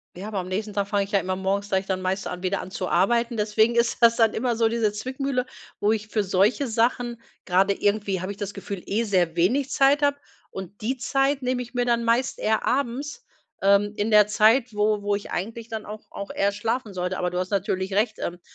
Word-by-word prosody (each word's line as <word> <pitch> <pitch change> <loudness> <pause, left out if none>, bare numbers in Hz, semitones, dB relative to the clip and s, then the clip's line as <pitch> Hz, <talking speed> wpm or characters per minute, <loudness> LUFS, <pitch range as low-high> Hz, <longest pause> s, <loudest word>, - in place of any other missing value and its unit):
Ja, 190 +4 -7
aber 205 -3 -2
am 180 - -5
nächsten 205 +3 -3
Tag 200 -1 -1
fange 200 -1 +1
ich 195 - -9
ja 200 - +3
immer 185 0 -2
morgens 195 +2 -1
gleich 190 -1 0
dann 190 -1 -2
meistens 185 +1 -2
an 180 0 -6
wieder 190 +1 0
an 185 - -9
zu 185 -1 -3
arbeiten. 235 +6 +2
Deswegen 220 +2 +2
ist 235 0 +2
das 230 0 +6
dann 225 -2 +3
immer 240 0 0
so 225 0 +3
diese 225 -2 +1
Zwickmühle, 260 +4 -2 0.3
wo 205 - +2
ich 215 -1 -2
für 215 -1 0
solche 200 +8 +2
Sachen, 235 +1 0 0.2
grade 190 +2 +3
irgendwie 200 -1 0
habe 185 +2 -4
ich 200 - -9
das 205 -1 -5
Gefühl, 200 -1 -6
eh 215 +4 0
sehr 180 -6 +1
wenig 250 +11 +2
Zeit 275 +2 +3
habe 285 -1 +2 0.3
und 190 +1 -9
die 255 +5 -1
Zeit 270 +3 +1
nehme 250 0 0
ich 245 0 -9
mir 245 -1 0
dann 235 -1 +1
meist 235 +3 +1
eher 220 0 +1
abends, 280 - -2 0.4
ähm, 200 +1 +3
in 210 +2 -1
der 210 -1 +7
Zeit, 225 +3 +3
wo 210 0 +1
wo 205 0 0
ich 200 - -7
eigentlich 225 +5 -4
dann 220 -2 -6
auch 210 +1 -8
auch 200 - -6
eher 200 +1 +1
schlafen 225 +1 -3
sollte. 180 0 -2
Aber 180 - 0
du 180 - -3
hast 185 0 -2
natürlich 195 -1 -1
recht. 215 +2 +1
Ähm, 175 0 -4
210 Hz, 235 wpm, -24 LUFS, 195-235 Hz, 0.4 s, der